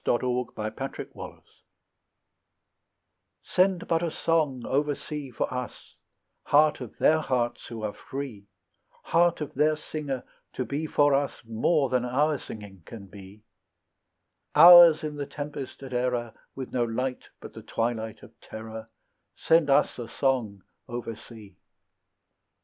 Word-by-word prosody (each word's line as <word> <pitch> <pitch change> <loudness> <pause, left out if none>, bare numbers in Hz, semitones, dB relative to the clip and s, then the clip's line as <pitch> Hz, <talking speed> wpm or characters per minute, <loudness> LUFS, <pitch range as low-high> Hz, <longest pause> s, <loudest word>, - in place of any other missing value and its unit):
TO - - +2
WALT 125 -1 -2
WHITMAN 110 +5 -4
IN - - -7
AMERICA - - -10 2.0
SEND 185 -1 +1
but 165 -1 +1
a 170 - 0
song 155 -6 0
oversea 145 0 -2
for 125 - -3
us, 125 -1 -7 0.5
Heart 150 -1 +4
of 125 - -9
their 160 +1 +4
hearts 120 -5 -2
who 115 -2 -7
are 105 -1 -2
free, 130 -8 -7 0.6
Heart 170 -1 +2
of 150 - -5
their 155 +3 +2
singer, 150 -4 -5 0.3
to 130 - -3
be 150 +3 -3
for 145 -1 +3
us 140 -2 -1
More 135 +6 +1
than 125 -1 +1
our 140 +4 +1
singing 100 -4 -10
can 110 -4 -9
be; 100 +2 -14 1.1
Ours, 170 0 +9
in 150 -1 -4
the 145 -1 -4
tempest 145 -2 -7
at 130 -1 -8
error, 125 -2 -1 0.2
With 130 -1 -7
no 125 - +1
light 125 +3 -3
but - - -11
the - - -9
twilight 115 -1 -3
of - - -13
terror; 110 0 -9 0.5
Send 160 -2 +3
us 135 - +3
a 120 - -5
song 115 -9 -1 0.3
oversea! 115 -3 -8
130 Hz, 140 wpm, -27 LUFS, 115-150 Hz, 2.0 s, Ours